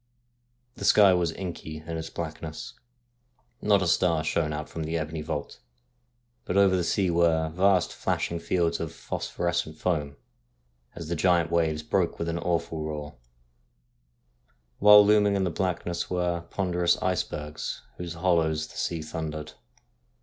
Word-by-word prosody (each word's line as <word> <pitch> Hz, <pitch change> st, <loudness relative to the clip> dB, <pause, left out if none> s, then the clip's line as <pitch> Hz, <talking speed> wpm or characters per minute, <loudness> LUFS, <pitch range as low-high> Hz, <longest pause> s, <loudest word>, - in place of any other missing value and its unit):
The -, -, -7 dB
sky 100 Hz, -3 st, +6 dB
was 85 Hz, -2 st, +1 dB
inky 80 Hz, -4 st, -7 dB
in 85 Hz, +1 st, -5 dB
its 80 Hz, 0 st, -5 dB
blackness. 80 Hz, -5 st, -6 dB, 0.9 s
Not 100 Hz, -2 st, +3 dB
a -, -, 0 dB
star 85 Hz, -2 st, +2 dB
shone 75 Hz, 0 st, 0 dB
out 75 Hz, 0 st, -4 dB
from 80 Hz, -, -5 dB
the 80 Hz, +2 st, -2 dB
ebony 80 Hz, 0 st, -4 dB
vault; 75 Hz, -1 st, -5 dB, 0.8 s
but 90 Hz, -, -2 dB
over 100 Hz, -1 st, +5 dB
the 90 Hz, -, +1 dB
sea 95 Hz, +1 st, +1 dB
were 85 Hz, -2 st, +2 dB
vast 90 Hz, +2 st, +2 dB
flashing 85 Hz, -, -2 dB
fields 85 Hz, -1 st, 0 dB
of 80 Hz, -, -4 dB
phosphorescent 85 Hz, -2 st, -3 dB
foam 75 Hz, -6 st, -1 dB, 0.8 s
as 85 Hz, -2 st, -7 dB
the 85 Hz, -, -2 dB
giant 85 Hz, -1 st, +2 dB
waves 80 Hz, -2 st, +1 dB
broke -, -, 0 dB
with 85 Hz, -, -3 dB
an 85 Hz, +1 st, -2 dB
awful 85 Hz, -2 st, -1 dB
roar; 75 Hz, -1 st, -6 dB, 1.6 s
while 105 Hz, 0 st, +9 dB
looming 105 Hz, -1 st, +4 dB
in 95 Hz, -, +1 dB
the 90 Hz, -, 0 dB
blackness 90 Hz, -2 st, -2 dB
were 90 Hz, -2 st, -1 dB
ponderous 90 Hz, -3 st, +1 dB
icebergs 75 Hz, -4 st, -3 dB, 0.2 s
in 90 Hz, -, -4 dB
whose 85 Hz, -1 st, -6 dB
hollows 80 Hz, -3 st, +1 dB
the -, -, -13 dB
sea 85 Hz, -2 st, -2 dB
thundered. 80 Hz, -1 st, -5 dB
85 Hz, 150 wpm, -27 LUFS, 80-90 Hz, 1.6 s, while